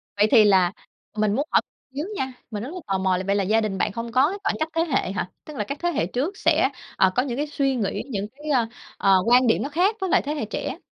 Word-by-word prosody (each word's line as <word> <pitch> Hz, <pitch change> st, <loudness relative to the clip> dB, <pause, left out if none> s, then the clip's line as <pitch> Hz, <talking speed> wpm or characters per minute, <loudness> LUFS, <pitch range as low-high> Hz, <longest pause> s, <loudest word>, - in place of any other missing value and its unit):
Vậy 210 Hz, +1 st, +4 dB
thì 225 Hz, -4 st, +8 dB
là, 190 Hz, -3 st, +4 dB, 0.5 s
mình 210 Hz, -1 st, +2 dB
muốn 285 Hz, +3 st, -1 dB
hỏi -, -, +5 dB, 0.3 s
xíu 300 Hz, +4 st, -2 dB
nha, 265 Hz, -4 st, -3 dB, 0.2 s
mình 210 Hz, 0 st, -4 dB
rất 265 Hz, -, -5 dB
là 365 Hz, -, -5 dB
tò 195 Hz, -, 0 dB
mò 190 Hz, -1 st, +1 dB
là 185 Hz, -, -3 dB
vậy 200 Hz, -, +2 dB
là 200 Hz, -, +1 dB
gia 220 Hz, +4 st, +2 dB
đình 205 Hz, -3 st, -2 dB
bạn 210 Hz, -, 0 dB
không 230 Hz, +2 st, -5 dB
có 260 Hz, +6 st, +4 dB
cái 400 Hz, -, -4 dB
khoảng 400 Hz, -, 0 dB
cách 315 Hz, -, 0 dB
thế 330 Hz, -, +3 dB
hệ 265 Hz, -, 0 dB
hả? 195 Hz, -2 st, -3 dB, 0.2 s
Tức 300 Hz, -3 st, -9 dB
là 210 Hz, -, 0 dB
các 280 Hz, +7 st, -5 dB
thế 345 Hz, -, 0 dB
hệ 220 Hz, -, 0 dB
trước 290 Hz, -, -3 dB
sẽ, -, -, +3 dB, 0.3 s
ờ, 190 Hz, -, +5 dB
có 250 Hz, -, +3 dB
những 250 Hz, -2 st, -4 dB
cái 295 Hz, -, -1 dB
suy 275 Hz, -2 st, 0 dB
nghĩ, 220 Hz, -3 st, -2 dB
những 205 Hz, -3 st, -3 dB
cái, 295 Hz, +6 st, -10 dB
ơ, 240 Hz, -4 st, +2 dB, 0.3 s
ờ, 195 Hz, -1 st, +4 dB
quan 245 Hz, +2 st, +5 dB
điểm 225 Hz, -, +3 dB
nó 280 Hz, -, -3 dB
khác 370 Hz, +8 st, +2 dB
với 380 Hz, -, -1 dB
lại -, -, +4 dB
thế 290 Hz, -, -3 dB
hệ 285 Hz, -, -2 dB
trẻ? 215 Hz, -, -4 dB
245 Hz, 290 wpm, -24 LUFS, 205-290 Hz, 0.5 s, thì